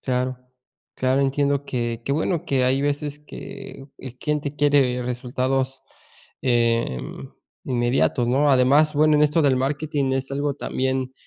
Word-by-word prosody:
Claro. 130 0 -1 0.6
Claro, 130 +2 +1
entiendo 140 +1 +1
que, 120 -3 -3
qué 140 - -1
bueno 160 +2 -1
que 130 -2 +1
hay 130 +2 +2
veces 145 0 -2
que 145 -2 -10
el 125 -1 -10
cliente 150 -1 -2
quiere 140 -4 +2
resultados, 130 +2 -2 0.6
eh, 115 - +1 0.7
inmediatos, 120 -1 +1
¿no? 140 +4 +3
Además, 140 +4 +4
bueno, 155 +1 +4
en 150 - +4
esto 150 +2 +3
del 135 -3 +3
marketing 140 0 -1
es 135 0 -2
algo 140 +1 -1
también, 130 -1 -2
135 Hz, 140 wpm, -23 LUFS, 125-145 Hz, 0.7 s, Además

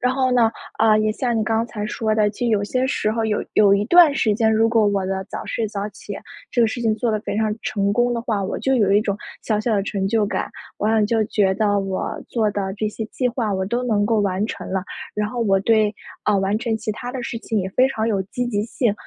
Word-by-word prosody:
然 250 +1 +2
后 260 -1 +1
呢， 235 -2 +4 0.3
啊， 220 -1 +5
也 215 0 +1
像 240 -1 -1
你 215 - 0
刚 225 +1 +1
才 210 -2 -5
说 220 -1 -1
的， 210 -1 +3
就 240 +4 -3
有 210 -3 +2
些 255 +4 0
时 215 -4 0
候 230 - -1
儿 225 - +1
有 210 -1 -1
有 200 -2 +5
一 200 +1 +1
段 345 +1 +7
时 215 -6 +2
间， 220 0 +2
如 225 +1 +4
果 225 -2 +3
我 200 -2 +1
的 190 0 -2
早 - - -6
睡 220 -2 -2
早 200 0 -4
起， - - -8 0.4
这 240 - +1
个 - - +5
事 240 +2 -4
情 225 -2 +2
做 230 +1 0
得 215 - -1
非 210 - -4
常 215 -1 +1
成 200 -1 0
功 240 +2 +2
的 235 - -2
话， 215 -5 -1
我 190 - -3
就 265 0 +1
有 205 -5 +3
一 205 - +5
种 205 -2 -1 0.3
小 215 -2 0
小 220 0 0
的 200 - +1
成 195 -1 -2
就 220 -1 +2
感， - - -2 0.3
我 210 - -1
好 220 - +2
像 220 -1 +3
就 225 0 +2
觉 195 -3 +2
得 205 -1 +2
我 195 -1 -2 0.2
做 220 -3 +1
的 195 -1 -3
这 215 - 0
些 220 +1 -5
计 250 +2 -1
划 230 -4 -1
我 190 0 -1
都 240 +4 -1
能 205 -4 +1
够 225 -1 +2
完 195 0 0
成 - - -6
了， 190 - 0 0.3
然 210 0 -1
后 240 +1 -4
我 195 -4 +3
对 215 0 +2 0.3
啊， 210 -1 +2
完 195 +2 +1
成 230 -2 -1
其 215 0 -4
它 245 +3 -6
的 255 -2 -4
事 235 - -4
情 225 -1 -2
也 185 - -3
非 255 +6 +4
常 225 -4 -1
有 195 -3 0
积 245 +6 -4
极 205 -3 -1
性。 230 -1 0
215 Hz, 295 characters per minute, -21 LUFS, 205-235 Hz, 0.4 s, 段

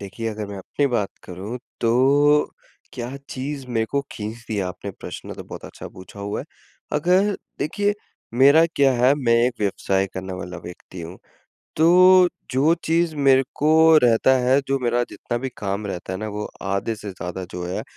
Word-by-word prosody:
देखिए, 100 +3 -5
अगर 105 -1 -5
मैं 100 0 -7
अपनी 140 +9 -1
बात 115 -6 0 0.2
करूँ 100 +7 -6 0.2
तो 140 +5 +4 0.4
क्या 125 +2 -5
चीज़ 135 +1 -5
मेरे 115 -2 0
को 140 - +1
खींचती 110 +1 -6
हैं 100 - 0
आपने 90 +2 -6
प्रश्न - - -8
तो - - -8
बहुत - - -9
अच्छा - - -9
पूछा 95 +2 -12
हुआ 100 +1 -3
है। - - -8 0.5
अगर 185 +7 +2 0.2
देखिए 205 +7 0 0.4
मेरा 140 +5 +7
क्या 135 -2 +4
है, 125 +3 +4
मैं 120 -5 +2
एक 125 - -2
व्यवसाय 95 -1 0
करने 95 0 -5
वाला 90 -1 -6
व्यक्ति 90 +1 -10
हूँ 85 +2 -8 0.6
तो 180 +3 +6 0.2
जो 140 +6 +3
चीज़ 165 0 +1
मेरे 135 -2 +5
को 160 +1 +5
रहता 120 +2 +4
है, 130 +3 +3
जो 135 - +1
मेरा 120 -1 +1
जितना 120 - -4
भी 135 +2 -3
काम 100 +1 -3
रहता 90 -1 -5
है 95 - -4
ना 110 - -4
वो 105 0 -5
आधे 100 +3 -1
से 105 -1 -7
ज़्यादा 90 0 -6
जो 90 0 -5
है 90 - -3
120 Hz, 180 wpm, -22 LUFS, 100-145 Hz, 0.6 s, मेरा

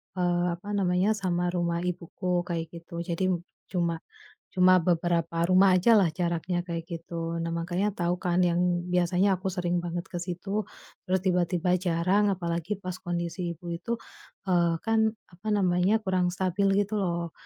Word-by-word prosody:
eee, 175 -1 +1
apa 185 +4 -15
namanya, 190 0 +2
sama 185 -4 -1
rumah 170 -1 0
ibuku 180 +1 -4 0.2
kayak 165 -2 -2
gitu, 170 +1 -12
jadi 170 +1 -2 0.5
cuma 170 -3 0 0.6
cuma 185 0 +6
beberapa 170 -1 +1
rumah 185 0 +5
ajalah 200 -4 +5
jaraknya 175 +1 -1
kayak 165 -1 -3
gitu. 165 0 -4
Nah 165 0 -2
makanya 175 +4 -1
tau 175 +1 0
kan 180 0 0
yang 175 0 +2 0.3
biasanya 180 +2 +2
aku 195 - -3
sering 175 -1 0
banget 175 0 -3
ke 175 - -3
situ, 185 +4 -3 0.4
terus 190 +1 +2
tiba-tiba 180 -1 +1
jarang, 185 +4 +2
apalagi 170 +2 -2
pas 185 -1 -4
kondisi 170 0 -3
ibu 170 +1 -8
itu, 230 +8 -3 0.5
eee, 170 -2 +3
kan 225 -1 +2 0.3
apa 185 +5 -11
namanya, 185 +1 +2
kurang 185 -2 +1
stabil 190 +2 +1 0.2
gitu 210 +1 -3
loh. 170 -3 -1
175 Hz, 150 wpm, -27 LUFS, 170-185 Hz, 0.6 s, cuma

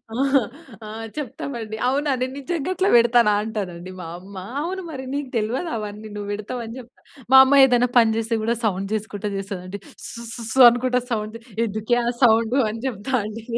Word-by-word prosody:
ఆహ్, 270 -1 +2 0.4
ఆహ్, 225 +1 -6
చెప్తామండి, 240 -5 -5
"అవునా! 285 +2 +1
నేను 255 +1 -2
నిజంగా 320 +4 -3
అట్లా 380 +2 +2
పెడతాన 235 -1 +4
అంటానండి" 185 -5 -5
మా 180 - -7
అమ్మ, 195 +2 -13 0.3
"అవును 375 +4 -3
మరి, 265 -3 -6
నీకు 285 -2 -3
తెల్వదు 240 +11 -1
అవన్నీ 210 0 -6
నువ్వు 205 -1 -5
పెడతావ్" 215 +4 -5
అని 225 +3 -8
చెప్తా. 250 +1 -15 0.3
మా 265 - +10
అమ్మ 280 +1 +5
ఏదైనా 245 -1 +3
పని 225 -2 +5
చేస్తే 225 +1 -1
కూడా 230 +2 +1
సౌండ్ 195 -1 -1
చేసుకుంటా 210 -1 -4
చేస్తది 195 -2 -5
అండి, 200 +2 -6 0.3
స్‌స్‌స్‌స్ 235 0 -7
అనుకుంటా 250 +1 0
సౌండ్ 215 0 -2 0.3
ఎందుకే 220 +2 -1
ఆ - - -1 0.2
సౌండ్ 230 0 +4
అని 225 +1 -6
చెప్తా 240 +2 -5
అండి. 215 +1 -7
230 Hz, 170 wpm, -22 LUFS, 215-255 Hz, 0.4 s, మా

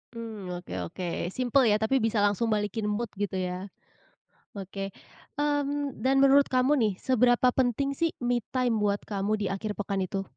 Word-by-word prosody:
Mmm, 220 -5 -7
oke 175 - -9 0.2
oke, 180 - -6 0.2
simpel 250 +3 +2
ya 210 - +4
tapi 220 +5 +1
bisa 225 0 0
langsung 205 +3 +1
balikin 210 0 -1
mood 225 +3 -2
gitu 200 -1 -3
ya. 185 +1 -3 0.9
Oke. 195 0 -6 0.4
Mmm, 290 -1 -1
dan 265 +1 +2
menurut 275 +1 +6
kamu 260 +3 +2
nih 215 -4 +2
seberapa 250 +2 +3
penting 260 +2 +1
sih 330 +4 -1
me 245 0 +2 0.2
time 245 -3 +2
buat 205 -1 0
kamu 200 0 -2
di 205 -1 -3
akhir 205 +2 -3
pekan 200 -1 -2
itu? 195 +1 -3
220 Hz, 170 wpm, -28 LUFS, 200-255 Hz, 0.9 s, menurut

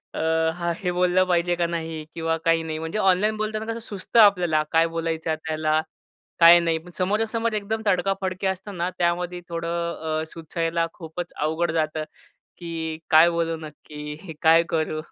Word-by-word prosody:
अ, - - -3 0.4
हां, 170 -1 -1
हे 180 - +1
बोललं 180 +1 +3
पाहिजे 175 0 +2
का 170 -1 0
नाही 160 -2 -4
किंवा 165 0 -1
काही 165 0 +3
नाही 160 -1 -4
म्हणजे 160 +6 -4
ऑनलाईन 200 +3 +2
बोलताना 215 0 -2
कसं 230 - -6
सुचतं 200 +3 0
आपल्याला 180 -7 +5
काय 165 0 +4
बोलायचं 165 -1 -3
आहे 155 - -1
त्याला, 155 0 +1 0.6
काय 170 +1 +9
नाही, 165 -1 +1
पण 175 +2 -12
समोरासमोर 220 +4 0
एकदम 215 +1 -2
तडका-फडकी 190 0 0
असतं 190 0 -4
ना, 175 +2 0
त्यामध्ये 175 0 -1
थोडं 170 -2 -2
अ, - - -3
सुचायला 165 0 -2
खूपच 170 +1 -7
अवघड 160 +2 0
जातं 155 -1 -1 0.5
की 165 -2 -5
काय 160 +2 +7
बोलू 165 -1 -1
नक्की, 150 +1 -9
काय 165 +1 +6
करू? 155 -1 -1
170 Hz, 165 wpm, -24 LUFS, 160-185 Hz, 0.6 s, काय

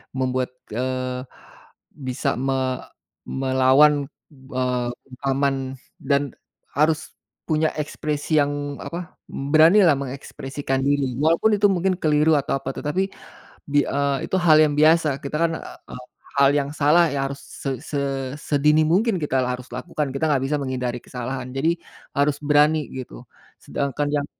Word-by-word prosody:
membuat, 130 -1 0 0.2
eee, 130 +1 -2 0.7
bisa 130 -3 -2
me 130 -1 -1 0.4
melawan, 135 +2 +3 0.3
eee, 130 -2 -2
bungkaman 135 +2 -1 0.5
dan 140 -1 0 0.4
harus 155 +1 +1 0.3
punya 155 0 +1
ekspresi 150 +1 -2
yang, 145 0 -3
apa, 170 0 -7 0.2
beranilah 160 +4 +5
mengekspresikan 135 0 -4
diri 140 -2 +1
walaupun 165 - +3
itu 205 0 +4
mungkin 185 0 +1
keliru 155 -2 +3
atau 135 -1 0
apa 135 +1 -5
tetapi, 185 +6 -1 0.6
bi 145 0 +3
eee, 140 -1 0
itu - - -2
hal 155 -3 +6
yang 145 - 0
biasa, 155 -2 +3
kita 140 +2 -5
kan, 165 - 0
e - - -11 0.5
hal 140 +1 +5
yang 140 -1 0
salah 155 +3 +4
yang 135 -1 -1
harus 140 0 -8
se 135 - -6
se 145 - -3 0.4
sedini 150 +1 +3
mungkin 190 +3 +2
kita 135 -3 0
la 125 - -1
harus 125 0 -7
lakukan, 145 +3 -3
kita 150 +4 0
nggak 135 -2 +1
bisa 150 - 0
menghindari 125 -3 -2
kesalahan. 130 +1 -5
Jadi, 160 +5 +1 0.4
harus 145 0 +2
berani 150 +1 +3
gitu, 125 - -9 0.3
sedangkan 140 +1 -2
yang 145 -1 0
140 Hz, 140 wpm, -23 LUFS, 130-155 Hz, 0.7 s, hal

